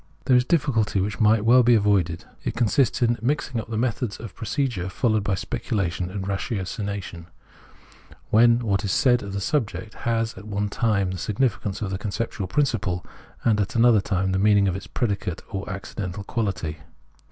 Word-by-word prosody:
There 130 -1 +4
is 125 - +6
a 125 - -8
difficulty 120 - +1
which 105 +3 -2
might 110 -1 +4
well 125 +3 +7
be 120 0 +5
avoided. 100 -6 +1 0.2
It - - -3
consists 120 +1 +2
in 120 0 +2
mixing 130 -2 -1
up - - -13
the 110 - -2
methods 120 -1 -1
of 115 -4 -8
procedure 115 -5 -2
followed 110 0 +1
by 100 -1 0
speculation 95 -5 -2
and 95 +1 -4
ratiocination, 100 -2 -4 1.0
when 115 +2 +6
what 100 -3 +1
is 100 - -1
said 125 +3 +3
of 100 -1 -6
the 100 - -2
subject 110 -1 -2
has 115 -1 -1
at 105 - -12
one 105 0 -1
time 100 -4 +1
the 95 - -5
significance 105 0 -1
of 95 -2 -3
its 95 - -4
conceptual 105 -2 -3
principle, 105 -7 0 0.4
and 110 -3 +3
at 100 - -3
another 115 -2 +5
time 95 0 0
the 95 - +1
meaning 100 0 +4
of 90 - 0
its 95 - -7
predicate 100 -7 -2
or 95 0 -4
accidental 100 0 -5
quality. 100 -9 -3
105 Hz, 180 wpm, -24 LUFS, 95-115 Hz, 1.0 s, well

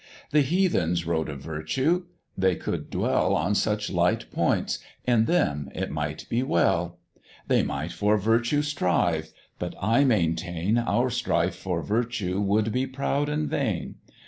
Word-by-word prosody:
The 150 - +5
Heathens 130 - +1
wrote 80 -1 -1
of 70 -3 -6
Virtue: 130 - -1 0.3
they 95 -1 +2
could - - -4
dwell - - +1
On 85 +7 +1
such 105 0 0
light 90 -1 +1
points: - - 0 0.3
in 120 -3 +3
them 75 - +1
it - - -3
might 75 0 -3
be 115 - 0
well; 85 -10 +1 0.5
They - - +3
might - - -3
for 105 +1 +2
virtue 115 +7 +2
strive; 85 - 0 0.3
but - - -4
I 115 +7 +3
maintain, 90 - +1
Our 120 +2 +1
strife 125 +1 0
for - - -3
virtue 110 -4 -1
would 105 +2 +1
be 130 +3 0
proud 140 +2 -1
and 150 0 -1
vain. 110 -11 -2
105 Hz, 145 wpm, -26 LUFS, 85-130 Hz, 0.5 s, The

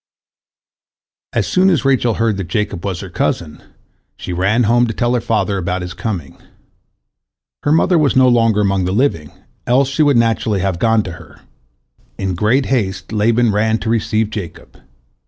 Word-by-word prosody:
As - - 0
soon 185 +1 +2
as 165 -6 +1
Rachel 125 -4 +2
heard 115 -3 0
that 95 -3 -4
Jacob 105 -4 -3
was 95 -3 -3
her 95 - -8
cousin, 80 -3 -2 0.6
she 90 - -6
ran 100 +7 +1
home 120 +2 +3
to 110 - -4
tell 120 0 0
her 125 - 0
father 110 -4 -1
about 90 0 -3
his 90 0 -6
coming. 95 - -5 1.2
Her 145 - 0
mother 165 +2 +3
was 145 -3 +2
no 130 0 +5
longer 115 -4 +3
among 100 -2 +1
the 90 - -1
living, 100 - 0 0.4
else 130 +2 +3
she 140 +3 -1
would 145 -4 +4
naturally 115 -3 +1
have 95 -3 -2
gone 110 0 +2
to 90 - -6
her. 85 - -14 0.8
In 95 -1 -2
great 110 +9 +1
haste 95 -7 -2
Laban 115 +2 +2
ran 110 +2 +1
to 110 - -3
receive 110 -1 0
Jacob. 100 -6 -8
110 Hz, 175 wpm, -17 LUFS, 95-120 Hz, 1.2 s, no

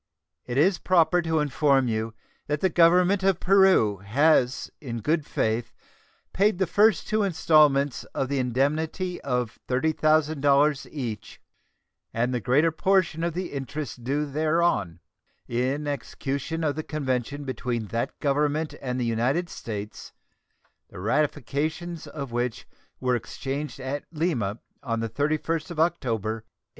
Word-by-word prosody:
It 120 +1 -3
is 175 +4 +3
proper 175 -1 +3
to 160 -2 0
inform 140 -2 +2
you 110 0 -2 0.3
that 150 0 -1
the 190 - +2
Government 180 +4 +4
of 190 -2 +2
Peru 190 - +4
has 130 - +2
in 120 -5 -5
good 155 +4 0
faith 110 +1 -1 0.6
paid 200 0 +2
the 190 - +2
first 205 +2 +3
two 215 0 +1
installments 150 -7 +3
of 135 - -3
the 140 0 -1
indemnity 155 +8 -1
of 125 -4 -2
$30,000 150 0 +2
each, 115 -7 -6 0.8
and 120 +2 0
the 125 - 0
greater 140 +8 +3
portion 170 -1 +1
of 170 -1 -1
the 180 -3 -4
interest 135 -2 -5
due 145 +4 0
thereon, 150 - 0 0.5
in 130 +5 -1
execution 140 +3 -3
of 150 -2 0
the 155 - -2
convention 140 -2 -3
between 125 -4 -3
that 115 +4 -3
Government 150 +2 0
and 125 -1 -3
the 125 - 0
United 125 +10 0
States 105 -5 -7 0.8
the - - -10
ratifications 150 - -1
of 140 -5 -6
which 120 0 -2 0.3
were 125 -1 +1
exchanged 140 +5 -5
at 135 +2 -4
Lima 145 - -1 0.2
on 115 -2 -2
the 115 0 -2
31st 155 - -1
of 170 -3 -6
October, 125 - 0
1846. 110 - -42
145 Hz, 135 wpm, -26 LUFS, 125-160 Hz, 0.8 s, Government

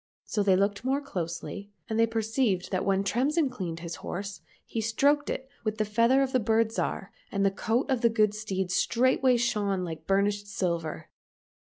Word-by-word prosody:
So 210 - -1
they 195 -2 +4
looked 200 +3 0
more 265 +2 +1
closely, 200 - -5 0.2
and 220 0 -1
they 230 - +5
perceived 225 -3 0
that 185 -1 0
when 195 0 +2
Tremsin 265 - +1
cleaned 175 -8 -5
his 170 0 -6
horse 195 -1 -5 0.2
he 225 - -3
stroked 280 +7 +2
it 265 - -3 0.2
with 215 -1 -2
the 215 - +1
feather 230 +6 +3
of 265 - -2
the 255 - +3
Bird 225 0 +2
Zhar, 200 -3 -3 0.2
and 200 0 +1
the 195 - +4
coat 225 +5 0
of 260 -4 0
the 235 - +5
good 215 -2 +2
steed 190 -4 -3
straightway 255 +5 +3
shone 205 -5 0
like 160 -2 -6
burnished 205 +1 +1
silver. 170 -5 -3
210 Hz, 185 wpm, -28 LUFS, 195-235 Hz, 0.2 s, they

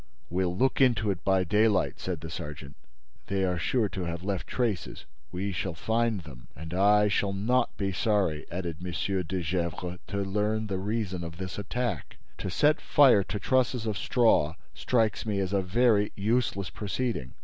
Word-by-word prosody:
"We'll 90 0 0
look 130 +4 +2
into 110 -5 +3
it 95 -2 -5
by 95 -1 +3
daylight," 105 +2 +2
said 90 -4 -4
the 80 0 -7
sergeant. 75 -3 -7 0.5
"They 95 0 0
are 90 -2 -1
sure 115 +5 +1
to 95 - -5
have 85 +1 -4
left 95 -2 -2
traces: 115 -8 -2 0.3
we 95 +3 -2
shall 90 -1 -3
find 115 +2 0
them." 65 -7 -12
"And 80 +4 -8
I 105 +3 +5
shall 100 -1 0
not 115 +6 +1
be 100 -1 -1
sorry," 95 -5 0
added 85 -3 -4
M. 90 - -4 0.3
de 90 +2 -3
Gesvres, 90 +1 -2
"to 100 - -4
learn 105 +3 0
the 95 -3 -2
reason 100 -3 -2
of 85 0 -7
this 95 +1 -5
attack. 120 +5 -3 0.2
To - - -3
set 150 - +3
fire 135 -8 +6
to 105 - -3
trusses 125 +2 +1
of 110 -2 -1
straw 110 -8 +2 0.2
strikes 110 -5 +1
me 105 -2 0
as 95 0 -1
a 100 - +3
very 105 +2 +3
useless 100 -4 0
proceeding." 105 - -3
100 Hz, 175 wpm, -28 LUFS, 90-110 Hz, 0.5 s, fire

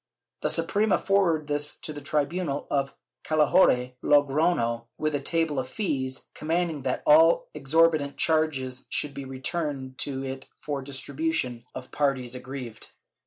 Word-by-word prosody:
The - - +1
Suprema 210 -1 +3
forwarded 175 -6 +1
this 145 0 0
to 155 - -4
the 145 - -8
tribunal 145 +1 -1
of 140 -1 0 0.3
Calahorra 150 -5 +3
(Logrofio), 145 -5 +2
with 155 0 -1
a 145 - 0
table 160 0 0
of 130 0 -4
fees, 130 -9 -3
commanding 165 -1 -1
that 130 -1 -2
all 160 +3 +5
exorbitant 150 0 +2
charges 135 -5 0
should 145 -1 -1
be 140 - -7
returned 135 -1 -4
to 135 -2 -2
it 135 0 -6
for 145 -2 -4
distribution 135 -1 -3 0.2
to - - -4
the - - -22
parties 135 -4 -1
aggrieved. 125 -3 -7
145 Hz, 140 wpm, -26 LUFS, 130-160 Hz, 0.3 s, all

